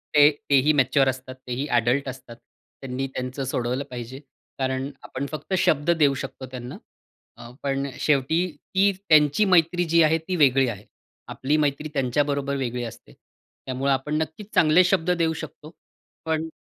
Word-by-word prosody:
ते 145 Hz, 0 st, +8 dB, 0.2 s
तेही 140 Hz, +2 st, +4 dB
मॅच्युअर 135 Hz, -1 st, +3 dB
असतात. 130 Hz, 0 st, -6 dB
तेही 125 Hz, +4 st, -3 dB
ॲडल्ट 125 Hz, +2 st, +1 dB
असतात, 130 Hz, -2 st, -10 dB, 0.5 s
त्यांनी 135 Hz, 0 st, -3 dB
त्यांचं 130 Hz, +2 st, -4 dB
सोडवलं 125 Hz, +1 st, -2 dB
पाहिजे. 125 Hz, +1 st, -7 dB, 0.4 s
कारण 130 Hz, +1 st, -1 dB
आपण 135 Hz, -, -5 dB
फक्त 155 Hz, +4 st, -6 dB
शब्द 150 Hz, -3 st, +1 dB
देऊ 145 Hz, -2 st, +4 dB
शकतो 130 Hz, -, -7 dB
त्यांना, 125 Hz, -1 st, -7 dB, 0.6 s
अ, 120 Hz, -, -11 dB
पण 140 Hz, 0 st, -1 dB
शेवटी 150 Hz, +4 st, +2 dB, 0.3 s
ती 200 Hz, +1 st, +4 dB, 0.2 s
त्यांची 150 Hz, +5 st, +5 dB
मैत्री 175 Hz, -1 st, +3 dB
जी 165 Hz, +1 st, +3 dB
आहे, 155 Hz, +1 st, +3 dB
ती 165 Hz, +3 st, -4 dB
वेगळी 135 Hz, -4 st, +4 dB
आहे. 105 Hz, -3 st, -6 dB, 0.4 s
आपली 145 Hz, +4 st, -1 dB
मैत्री 150 Hz, 0 st, -1 dB
त्यांच्याबरोबर 140 Hz, +1 st, 0 dB
वेगळी 125 Hz, -2 st, -3 dB
असते. 115 Hz, -, -10 dB, 0.5 s
त्यामुळं 130 Hz, +2 st, -1 dB
आपण 135 Hz, +3 st, -1 dB
नक्कीच 195 Hz, +7 st, -7 dB
चांगले 160 Hz, +3 st, +5 dB
शब्द 180 Hz, -1 st, +1 dB
देऊ 165 Hz, -2 st, +1 dB
शकतो. 155 Hz, 0 st, -9 dB, 0.5 s
पण 160 Hz, 0 st, -1 dB
140 Hz, 150 wpm, -24 LUFS, 130-155 Hz, 0.6 s, ते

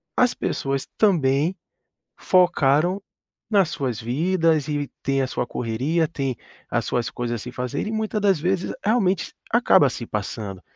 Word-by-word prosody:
as 250 Hz, -1 st, +3 dB
pessoas 135 Hz, 0 st, -2 dB
também 160 Hz, -4 st, +3 dB, 0.6 s
focaram 175 Hz, 0 st, +3 dB, 0.5 s
nas 195 Hz, -6 st, +3 dB
suas 130 Hz, -, -2 dB
vidas 160 Hz, +4 st, +1 dB
e 145 Hz, -1 st, -2 dB
têm 135 Hz, 0 st, +1 dB
a -, -, 0 dB
sua 125 Hz, -, -2 dB
correria, 130 Hz, +10 st, 0 dB
têm 135 Hz, -6 st, -3 dB, 0.3 s
as -, -, 0 dB
suas 120 Hz, -2 st, -1 dB
coisas 120 Hz, -1 st, -3 dB
a -, -, -5 dB
se 125 Hz, -, -7 dB
fazer 125 Hz, -, -3 dB
e -, -, -2 dB
muita 220 Hz, -1 st, -1 dB
das 195 Hz, -5 st, +3 dB
vezes 180 Hz, +3 st, -1 dB
realmente 195 Hz, -5 st, +1 dB, 0.2 s
acaba 230 Hz, -, +5 dB
se 120 Hz, -, -5 dB
passando, 100 Hz, -2 st, -5 dB
150 Hz, 150 wpm, -23 LUFS, 125-185 Hz, 0.6 s, acaba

